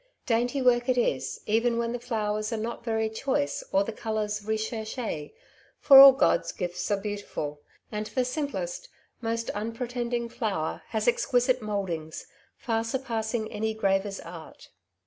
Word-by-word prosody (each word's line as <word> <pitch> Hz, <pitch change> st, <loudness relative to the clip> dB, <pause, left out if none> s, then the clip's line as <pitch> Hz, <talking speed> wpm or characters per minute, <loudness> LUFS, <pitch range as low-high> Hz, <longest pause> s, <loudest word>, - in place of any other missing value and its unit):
Dainty 245 Hz, +1 st, +1 dB
work 245 Hz, 0 st, +3 dB
it 255 Hz, -, +3 dB
is, 140 Hz, -, 0 dB
even 230 Hz, +2 st, +2 dB
when 235 Hz, 0 st, -1 dB
the 245 Hz, -, -3 dB
flowers 215 Hz, -3 st, -2 dB
are 225 Hz, -, -1 dB
not 230 Hz, +2 st, -4 dB
very 220 Hz, -1 st, 0 dB
choice 220 Hz, -, -1 dB
or 195 Hz, -, +3 dB
the 225 Hz, -, -4 dB
colours 215 Hz, -1 st, -2 dB
recherche^ 220 Hz, -, -3 dB, 0.5 s
for 270 Hz, -1 st, +9 dB
all 275 Hz, -1 st, +11 dB
God^s -, -, +2 dB
gifts 180 Hz, -1 st, -3 dB
are 205 Hz, -, +2 dB
beautiful; 195 Hz, -8 st, -5 dB, 0.3 s
and 210 Hz, 0 st, -3 dB
the 255 Hz, +2 st, 0 dB
simplest, 410 Hz, -, -4 dB, 0.3 s
most 230 Hz, 0 st, -2 dB
unpretending 235 Hz, +2 st, -3 dB
flower 205 Hz, -9 st, -2 dB
has 220 Hz, 0 st, -2 dB
exquisite 245 Hz, +1 st, +2 dB
mouldings, 185 Hz, -7 st, -4 dB, 0.3 s
far 225 Hz, -2 st, -1 dB
surpassing 225 Hz, -2 st, -2 dB
any 220 Hz, +1 st, -2 dB
graver's 195 Hz, -1 st, 0 dB
art. 165 Hz, -1 st, -11 dB
220 Hz, 145 wpm, -27 LUFS, 210-240 Hz, 0.5 s, all